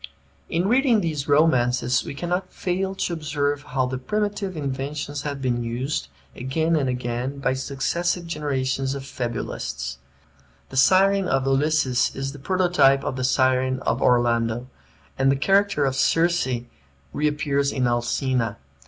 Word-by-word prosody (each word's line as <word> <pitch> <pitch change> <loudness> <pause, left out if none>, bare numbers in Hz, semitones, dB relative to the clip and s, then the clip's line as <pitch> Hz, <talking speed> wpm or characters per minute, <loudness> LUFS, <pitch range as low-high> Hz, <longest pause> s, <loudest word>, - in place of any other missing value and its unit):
In 175 +3 0
reading 245 -1 +3
these 155 -4 -2
romances, 125 -5 +3
we - - -7
cannot 180 +4 -2
fail 190 +1 -2
to 180 - -2
observe 145 -2 -1
how 130 -2 -1
the 130 0 -3
primitive 205 +3 -2
inventions 145 +1 -4
have 140 -2 -5
been 120 -2 0
used, 120 - -2 0.3
again 160 +6 0
and 140 -4 +1
again, 125 +2 -3
by 135 - 0
successive 160 +7 -1
generations 135 -4 -2
of 135 -1 -6
fabulists. 115 - -4 0.7
The 135 - -7
Siren 195 +5 +4
of 135 0 +1
Ulysses 135 -2 +2
is 135 0 -3
the 145 - -11
prototype 175 -5 +3
of - - -2
the 130 - -3
Siren 130 0 +2
of 115 +1 -1
Orlando, 120 -1 +2 0.5
and 135 0 +4
the - - +2
character 195 0 +2
of 135 -1 0
Circe 170 +3 +2 0.7
reappears 145 -2 0
in 130 -2 0
Alcina. 120 -1 0
140 Hz, 140 wpm, -23 LUFS, 130-165 Hz, 0.7 s, Siren